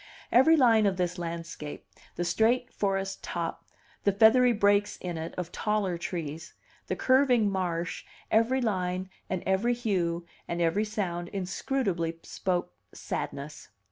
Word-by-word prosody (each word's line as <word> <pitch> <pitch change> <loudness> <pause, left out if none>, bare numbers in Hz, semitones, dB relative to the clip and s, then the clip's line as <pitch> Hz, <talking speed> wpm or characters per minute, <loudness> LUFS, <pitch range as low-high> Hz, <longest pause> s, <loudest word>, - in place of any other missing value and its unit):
Every 295 +7 +6
line 225 -6 +5
of 190 -2 0
this 180 0 -1
landscape, 165 -3 -6 0.3
the 175 - -2
straight 235 +7 +2
forest 195 -1 -1
top, 170 -1 -4 0.4
the 200 - +4
feathery 225 +5 +6
breaks 205 -2 +2
in 175 -2 -5
it 160 0 -5
of 175 -1 -4
taller 210 -4 0
trees, 165 -2 -5 0.3
the - - -1
curving 255 -5 +3
marsh, 175 -3 -2 0.3
every 230 +4 +3
line 185 -4 -1 0.2
and 185 -2 -2
every 205 +6 +2
hue 175 -8 -1 0.2
and 170 - -3
every 175 +6 +2
sound 175 -5 -3
inscrutably 185 -3 -2
spoke 180 - -2 0.2
sadness. 140 +2 -5
190 Hz, 135 wpm, -28 LUFS, 170-220 Hz, 0.4 s, Every